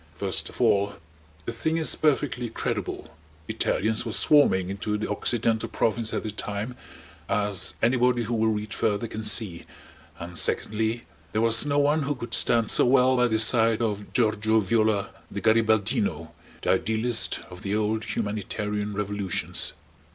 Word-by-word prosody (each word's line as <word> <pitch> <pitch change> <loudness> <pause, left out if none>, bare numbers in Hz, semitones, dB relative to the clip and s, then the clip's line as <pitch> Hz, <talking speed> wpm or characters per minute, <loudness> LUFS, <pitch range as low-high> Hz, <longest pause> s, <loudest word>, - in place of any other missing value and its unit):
First - - -1
of - - -14
all 100 0 +2 0.5
the - - -3
thing 160 +8 -1
is 160 - +3
perfectly 130 -5 0
credible: 110 - -4 0.3
Italians 110 +2 -1
were 115 - -5
swarming 95 -10 +4
into 105 +2 -3
the 105 - -3
Occidental 110 +1 0
Province 115 0 -1
at - - -3
the 110 - -4
time, 105 +3 -5 0.5
as 100 -1 0
anybody 125 0 +2
who 115 +2 -4
will 110 -1 +1
read 105 -1 -2
further 105 +1 -1
can 110 0 -6
see; 105 -5 +2 0.6
and 85 +1 -8
secondly, 110 +2 0 0.3
there 110 - +1
was 115 +4 +3
no 145 0 0
one 145 +2 +2
who 145 0 -2
could 120 -2 -8
stand 115 -2 +4
so - - +4
well 130 0 +4
by 125 -1 +3
the 110 -2 0
side 115 0 +4
of 105 -2 -3
Giorgio 110 -2 +2
Viola 110 0 +1 0.2
the 100 - -5
Garibaldino, 105 -7 +1 0.3
the - - +2
Idealist 110 +1 0
of 90 0 -11
the 100 +1 -2
old, 110 +1 -1
humanitarian 105 -1 -3
revolutions. 100 -5 -2
110 Hz, 155 wpm, -25 LUFS, 105-120 Hz, 0.6 s, swarming